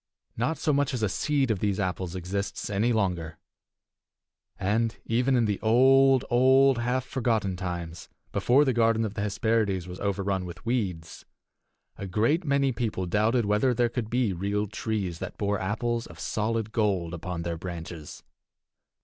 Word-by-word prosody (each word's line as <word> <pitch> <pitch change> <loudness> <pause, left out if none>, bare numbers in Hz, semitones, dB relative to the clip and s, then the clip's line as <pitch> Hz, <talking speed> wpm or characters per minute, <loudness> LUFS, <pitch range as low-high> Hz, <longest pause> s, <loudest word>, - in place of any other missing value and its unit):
Not 125 +8 -1
so 150 - 0
much 140 -1 +1
as 115 - -3
a 105 - +2
seed 140 +3 0
of 105 - -1
these 100 -1 0
apples 95 -2 -2
exists 100 +3 -4
any 105 +4 +1
longer. 90 -7 -1 1.2
And, 110 +4 0
even 125 +3 +2
in 120 -2 +3
the 105 -2 -1
old, 130 +4 +5
old, 130 +1 +4
half 125 +2 -1
forgotten 110 -8 0
times, 85 -3 -5 0.2
before 135 +4 +3
the 130 - +2
garden 115 -1 +2
of 105 - -4
the 100 - -4
Hesperides 100 -3 0
was 90 +1 -8
overrun 100 -1 -1
with 90 +2 -9
weeds, 95 -9 -3 0.8
a 100 - -5
great 115 - +1
many 140 -3 +2
people 110 -6 -2
doubted 110 +6 +1
whether 105 +5 +2
there 120 0 +2
could 115 -2 -4
be 120 -4 +1
real 100 +4 -1
trees 105 -5 -3
that - - -6
bore 100 -1 0
apples 115 +4 -2
of 85 -1 -13
solid 110 +2 -2
gold 95 -7 0
upon 85 0 -4
their 85 -1 -3
branches. 85 -3 -7
105 Hz, 160 wpm, -27 LUFS, 95-120 Hz, 1.2 s, old